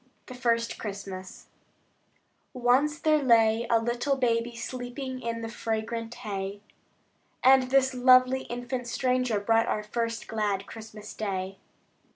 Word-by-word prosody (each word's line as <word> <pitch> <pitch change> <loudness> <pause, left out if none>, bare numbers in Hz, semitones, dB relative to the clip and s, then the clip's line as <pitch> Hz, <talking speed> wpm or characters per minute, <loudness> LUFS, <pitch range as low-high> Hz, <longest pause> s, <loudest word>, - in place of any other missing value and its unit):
The - - -9
First 235 -2 0
Christmas 195 -3 -7 1.1
Once 260 +4 +2
there 310 -2 +2
lay 230 -2 +4
a 230 - +5
little 240 +4 0
baby 235 -2 0
Sleeping 255 +2 -5
in 230 -1 -3
the 225 - -4
fragrant 225 +1 -3
hay, 200 -3 -5 0.8
And 260 0 +6
this 265 0 +3
lovely 255 +1 +5
infant 245 +1 -4
stranger 250 -2 0
Brought 225 +2 +2
our 210 - -1
first 230 +1 -3
glad 205 -3 -1
Christmas 215 -1 -10
day. 195 -2 -4
235 Hz, 125 wpm, -28 LUFS, 220-255 Hz, 1.1 s, And